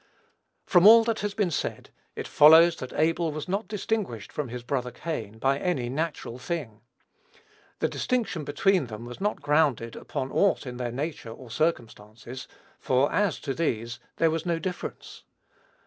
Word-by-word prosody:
From 180 +2 +6
all 230 +1 +9
that 225 -1 -1
has 205 0 -3
been 200 -5 +1
said, - - -4 0.2
it - - -5
follows, 160 +3 +7
that 130 - -7
Abel 165 +1 +1
was 150 0 -6
not 195 +4 -2
distinguished 205 - -3
from 150 -3 -3
his 125 0 -6
brother 125 0 -2
Cain 115 -6 -5
by 135 +4 +1
any 175 -8 -1
thing 120 +1 -4
natural. 150 -5 -3
The 155 - -8
distinction 230 - -1
between 150 +2 +1
them 110 +1 -8
was 120 +5 -9
not 205 -7 -1
grounded 145 -6 +1
upon 130 - -5
aught 200 -6 +2
in 125 -1 -6
their 120 -1 -3
nature 140 -1 -4
or 115 +1 -11
circumstances, 120 -5 -3 0.3
for, 130 +2 +2
as 205 -6 +1
to 140 - -3
these, 120 -6 -2 0.2
"there 165 -1 +2
was 165 0 -2
no 170 -2 0
difference." 180 +1 -6
150 Hz, 165 wpm, -27 LUFS, 125-175 Hz, 0.3 s, all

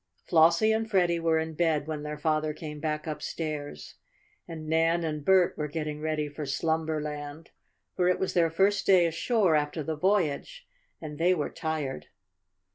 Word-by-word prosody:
Flossie 170 +6 +5
and 220 0 -1
Freddie 175 -4 +2
were 165 -1 +2
in 160 0 -2
bed 155 -2 +1
when 155 -1 -4
their 150 0 -5
father 155 0 0
came 150 -2 -7
back 150 0 -3
upstairs, 150 - -5 0.5
and 160 -2 -8
Nan 165 +2 +2
and 150 -2 -3
Bert 185 +1 +4
were 150 - -1
getting 150 0 -4
ready 155 -1 -1
for 145 +1 -7
Slumberland, 150 0 -3 0.4
for 180 - +2
it 180 - +2
was 190 - -2
their 170 -2 +3
first 195 +5 +1
day 185 -3 +6
ashore 180 +3 +1
after 150 +1 -1
the 160 +1 -3
voyage, 190 - -1 0.3
and 150 -2 -8
they 180 +2 +3
were 150 - -3
tired. 155 -4 -4
160 Hz, 165 wpm, -28 LUFS, 150-170 Hz, 0.5 s, day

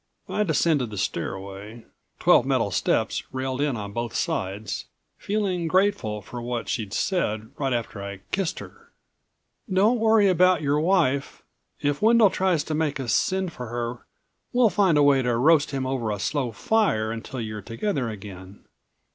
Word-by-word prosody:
I - - -1
descended 160 - +2
the 105 - -7
stairway, 100 +4 -5 0.3
twelve - - +5
metal - - 0
steps - - 0
railed 130 +1 -3
in 145 -5 0
on 100 -1 -6
both 120 -2 -4
sides, 100 +3 -2 0.3
feeling 195 -5 -1
grateful 185 - +1
for 120 +4 -7
what 120 0 -3
she'd 105 -4 -3
said 110 - -1
right 135 -2 0
after 115 -4 -3
I 100 -1 -7
kissed 195 -4 -1
her. - - -12 0.8
"Don't 210 +6 +3
worry 220 -2 +4
about 185 -2 +4
your 145 +1 +2
wife. 155 -5 +1 0.4
If 145 0 0
Wendel 225 -2 +5
tries 185 -5 +1
to 155 - -4
make 150 -2 -1
us 120 -4 -1
send 190 -2 0
for 125 -1 -7
her 120 +1 -4 0.5
we'll 245 -3 +4
find 180 -4 +3
a 145 - +5
way 140 -2 +5
to 120 -2 0
roast 150 +4 +4
him 135 -2 -3
over 130 -4 -2
a 105 - -2
slow 130 +4 -1
fire 110 - +1
until 115 +3 -6
you're 110 -2 -5
together 125 - -2
again. 95 -2 -10
135 Hz, 165 wpm, -25 LUFS, 110-180 Hz, 0.8 s, twelve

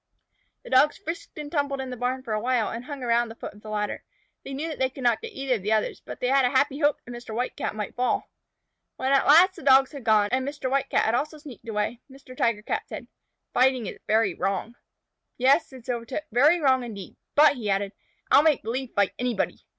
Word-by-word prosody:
The - - -12
Dogs 260 +3 +4
frisked 335 +2 -7
and 295 -1 -6
tumbled 285 -3 -1
in 265 -1 -5
the - - -4
barn 250 +2 -2
for 225 - -4
a 215 - 0
while 240 -1 0
and 235 +2 -6
hung 285 -2 -7
around 235 0 +2
the 225 - -9
foot - - -8
of 205 - -17
the 215 - -10
ladder. 210 -1 -3 0.4
They - - -8
knew 305 +3 -4
they 260 0 0
could 265 0 -10
not 240 - +2
get 460 - -5
either 270 -5 -1
of - - -11
the 210 +3 -2
others, 215 - -1
but - - -9
they 250 - 0
had 270 0 +4
a 250 - +3
happy 275 +2 +1
hope 290 -2 +2
that 245 - -9
Mr. 240 -2 -8
White 250 +2 -2
Cat - - -3
might 210 -1 -4
fall. 250 0 0 0.7
When 260 +1 -1
at 275 - +3
last 350 +6 +6
the - - -9
Dogs 265 -1 +5
had 280 -4 -9
gone, 215 -2 +3
and 260 +1 +1
Mr. 285 -3 -4
White 275 0 0
Cat - - +2
had 220 - +1
also 300 +5 -1
sneaked 270 -6 -11
away, 215 +2 -2
Mr. 265 -1 -14
Tiger 230 -4 0
Cat - - -1
said: - - -7 0.5
"Fighting 255 -2 +3
is - - -7
very 215 -3 +2
wrong." 195 +6 -2 0.6
"Yes," 275 +6 +3
replied 255 -3 -12
Silvertip, 245 +4 -4
"very 295 +9 +4
wrong 260 -4 +3
indeed. 205 -6 -8 0.2
But," 290 -1 +6
he 215 -4 -4
added, 195 +1 0 0.4
"I'll 275 - +8
make 305 -3 +2
believe 250 +3 -4
fight 200 -2 +2
anybody." 245 -1 -1
255 Hz, 235 wpm, -25 LUFS, 225-275 Hz, 0.7 s, I'll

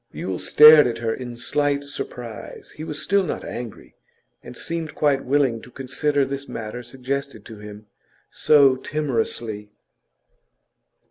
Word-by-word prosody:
Yule 95 -1 -4
stared 150 +9 +8
at 115 -1 -3
her 115 -1 -2
in 120 -1 -7
slight 145 +3 0
surprise. 125 -5 -8
He 155 - -9
was 150 -2 -4
still 200 +1 +2
not 175 - -4
angry, 120 -3 -8 0.5
and - - -11
seemed 165 -2 -5
quite 145 -3 +1
willing 130 -4 +1
to - - -14
consider 140 +2 -1
this 140 +1 -6
matter 115 +2 -6
suggested 130 -1 -5
to 110 -2 -11
him 105 0 -11 0.5
so 140 -3 +5
timorously. 115 -7 -3
130 Hz, 135 wpm, -22 LUFS, 115-145 Hz, 0.5 s, stared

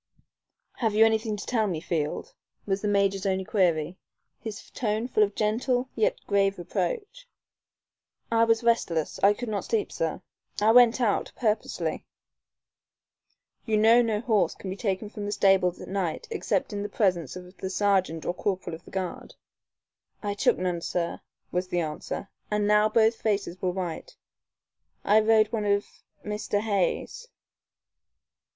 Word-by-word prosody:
"Have 225 -4 0
you 220 +1 +7
anything 220 -1 +1
to 205 - -7
tell 225 -4 +1
me, 170 -5 -2
Field?" 165 - -3 0.3
was 195 -1 -1
the 210 - -1
major's 200 -1 +1
only 190 0 0
query, 175 -4 +1 0.4
his 220 -2 -8
tone 220 0 -1
full 220 - +1
of 205 -1 +2
gentle 245 +4 0
yet 220 - +1
grave 200 0 +2
reproach. 475 - -3 1.0
"I 230 0 +4
was 225 0 +2
restless. 175 -9 +1
I 200 +1 +6
could 245 +3 -5
not 205 -3 -2
sleep, 220 -2 -1
sir. 165 -1 -3 0.4
I 215 +2 +4
went 245 0 +6
out 215 -4 +1
purposely." 220 -3 -1 1.6
"You 215 -1 +2
know 225 +3 +6
no 220 -3 0
horse 210 -8 +1
can 190 - -7
be - - -4
taken 200 -1 -2
from 205 -1 -7
the - - -2
stables 195 -3 +3
at - - -9
night 185 -5 -2
except 435 - -1
in 205 0 -3
presence 180 - 0
of 180 +1 -10
the 190 - -4
sergeant 190 -5 +1
or 175 - 0
corporal 185 -2 -3
of 160 - -14
the - - -13
guard." 185 -2 -5 0.9
"I 205 -1 -1
took 200 - +2
none, 180 -1 -2
sir," 170 0 -2 0.3
was 180 +1 -1
the 175 -1 0
answer, 155 +5 -5 0.2
and 210 0 +1
now 210 +1 +4
both 225 +1 +3
faces 200 -4 -1
were 185 - +1
white. 180 -3 -5 0.9
"I 210 +2 +5
rode 220 0 +4
one 215 -2 -1
of 200 0 +2 0.4
Mr. 210 0 -1
Hay's." 220 - -1
205 Hz, 155 wpm, -27 LUFS, 185-220 Hz, 1.6 s, you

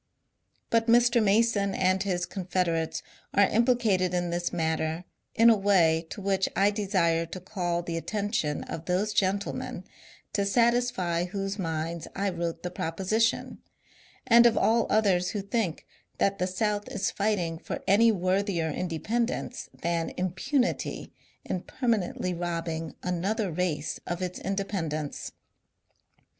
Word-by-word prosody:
But 230 0 +3
Mr. 240 0 +5
IV^ason 205 -1 +2
and 185 0 +2
his 180 -3 -1
confederates 175 -3 -1 0.3
are 200 -1 +6
implicated 220 -6 +2
in 175 -1 -1
this 175 0 -1
matter 160 0 -1 0.3
in 230 +1 +7
a - - +5
way 175 -5 +3
to - - -7
which 195 -1 +1
I 200 +1 +4
desire 185 -5 +1
to 185 - -7
call 175 -2 -2
the 170 -1 -3
attention 200 -5 -2
of 165 - -7
those 190 +5 0
gentlemen 200 +3 -1 0.5
to 205 -1 +1
satisfy 230 -6 +2
whose 195 +2 -4
minds 165 -1 -3
I 195 0 0
wrote 170 -1 -4
the 180 - -3
proposition, 195 +7 0 0.7
and 235 -1 +7
of 230 - +2
all 230 +1 +3
others 190 -5 +3
who - - -1
think 200 -5 -2 0.3
that 195 0 +1
the 180 - +1
South 205 +2 -1
is 200 0 -1
fighting 185 -6 -1
for - - -6
any 225 +4 +6
worthier 185 -3 0
independence 210 - -2
than 170 -1 -2
impunity 220 - -1 0.3
in 180 - -2
permanently 215 -7 -1
robbing 165 -2 -3
another 190 +3 -1
race 160 -3 -2
of 175 +1 -3
its 180 0 -4
independence. 180 -7 -3
190 Hz, 130 wpm, -28 LUFS, 170-210 Hz, 0.7 s, in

